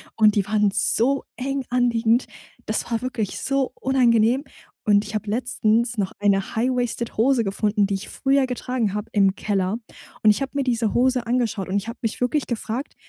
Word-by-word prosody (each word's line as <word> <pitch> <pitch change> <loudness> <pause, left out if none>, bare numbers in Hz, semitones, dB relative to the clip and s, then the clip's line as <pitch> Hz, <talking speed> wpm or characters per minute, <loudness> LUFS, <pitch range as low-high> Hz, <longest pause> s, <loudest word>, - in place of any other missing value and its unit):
Und 215 -2 +4
die 200 -2 +1
waren 210 -1 +2
so 235 +6 +1
eng 270 0 -2
anliegend. 240 -1 +2 0.4
Das - - -2
war 230 0 0
wirklich 240 -5 -3
so 270 -2 -1
unangenehm. 250 0 +3 0.4
Und 205 -1 +4
ich 215 - -8
habe 215 -1 -3
letztens 235 0 0
noch 195 -2 -1
eine 200 -1 +1
high-waisted 245 -1 -1
Hose 240 +1 +3
gefunden, 205 0 0
die 200 - -1
ich 195 - -6
früher 270 0 +2
getragen 250 -4 -2
habe 210 +1 -4
im 195 -2 +3
Keller. 200 0 -1 0.5
Und, 215 - +7
ich 210 - -1
habe 270 - -2
mir 280 - +1
diese 230 -4 0
Hose 250 -1 +2
angeschaut 230 -6 0
und 190 - -1
ich 205 +3 -3
habe 230 - -8
mich 225 +1 -3
wirklich 265 +3 0
gefragt, 235 +3 -4
230 Hz, 185 wpm, -23 LUFS, 210-255 Hz, 0.5 s, Und